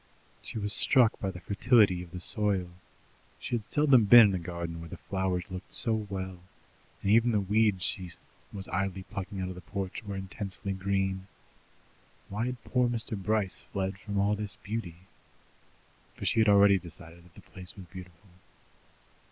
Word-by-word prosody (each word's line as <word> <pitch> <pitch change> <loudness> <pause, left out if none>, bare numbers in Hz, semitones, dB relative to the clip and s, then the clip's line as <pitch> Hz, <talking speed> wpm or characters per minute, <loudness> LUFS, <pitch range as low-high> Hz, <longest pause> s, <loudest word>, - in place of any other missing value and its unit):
She - - -6
was 105 0 -1
struck 125 -5 +4
by 95 - -2
the 90 -2 -8
fertility 100 -2 +3
of 90 - -10
the 90 +2 -7
soil; 95 -2 0 0.7
she - - -6
had 115 -3 -1
seldom 140 -6 +4
been 115 0 +9
in - - -1
a 95 - -1
garden 85 -1 -5
where 85 0 -9
the - - -8
flowers 95 -2 -2
looked 95 0 -7
so 115 -2 0
well, 95 -4 -4 0.6
and 100 - +2
even 115 +2 +5
the 105 - +2
weeds 105 -1 +2
she 90 -2 0 0.4
was 95 -1 -5
idly 95 -1 -2
plucking 100 -1 -6
out 90 - -3
of - - -5
the 90 - -10
porch 95 +4 -5
were 100 -2 -5
intensely 95 0 -5
green. 95 0 -1 1.0
Why 110 +4 -2
had 125 -2 -5
poor 125 -1 +1
Mr. 115 -1 -1
Bryce 100 0 -1
fled 95 0 -2
from 100 0 -5
all 100 +1 +2
this 105 -1 -2
beauty? 95 -6 -5 1.1
For - - -7
she 115 - +2
had 110 -1 +5
already 100 -1 +6
decided 85 0 -12
that 90 - -21
the - - -13
place 90 -2 -7
was 95 - -10
beautiful. 90 +1 -12
100 Hz, 175 wpm, -29 LUFS, 90-105 Hz, 1.1 s, been